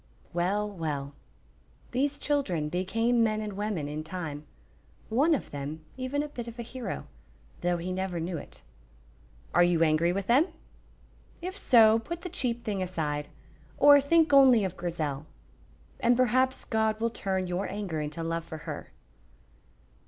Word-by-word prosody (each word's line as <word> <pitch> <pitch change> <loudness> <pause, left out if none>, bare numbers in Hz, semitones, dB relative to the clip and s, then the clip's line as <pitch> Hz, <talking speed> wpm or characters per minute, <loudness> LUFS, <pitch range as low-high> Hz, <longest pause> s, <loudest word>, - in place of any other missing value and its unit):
Well, 190 +5 0
well, 150 -8 -4 0.8
these 280 +3 0
children 185 - 0
became 225 +7 +1
men 215 -1 +1
and 210 -1 -4
women 200 -7 -2
in 150 +1 -4
time, 155 -3 -6 0.6
one 290 +8 +3
of - - -6
them 145 +2 -6
even 265 +3 -2
a - - -4
bit 245 -5 -7
of 235 0 -8
a 235 - -4
hero, 230 - -5 0.6
though 175 0 +1
he 175 +2 -4
never 185 -1 -2
knew 170 +2 -3
it. - - -12 0.9
Are 175 - +6
you 175 -2 +3
angry 160 +2 +3
with 195 +1 -2
them? 265 - +4 0.9
If 370 +2 -5
so, 225 - +6
put 340 +9 -6
the 360 - -5
cheap 240 -8 -1
thing 200 -3 -2
aside, 150 -5 -2 0.5
or 285 0 +8
think 320 +2 +3
only 260 -5 +7
of 185 -1 -4
Grizel, 155 -5 -3 0.7
and 240 0 +3
perhaps 255 +1 +2
God 220 -1 0
will 230 +1 0
turn 190 -4 -1
your 180 +2 -2
anger 190 -6 -3
into 150 +2 -4
love 165 0 -2
for 160 -1 -8
her. - - -6
195 Hz, 155 wpm, -28 LUFS, 165-245 Hz, 0.9 s, or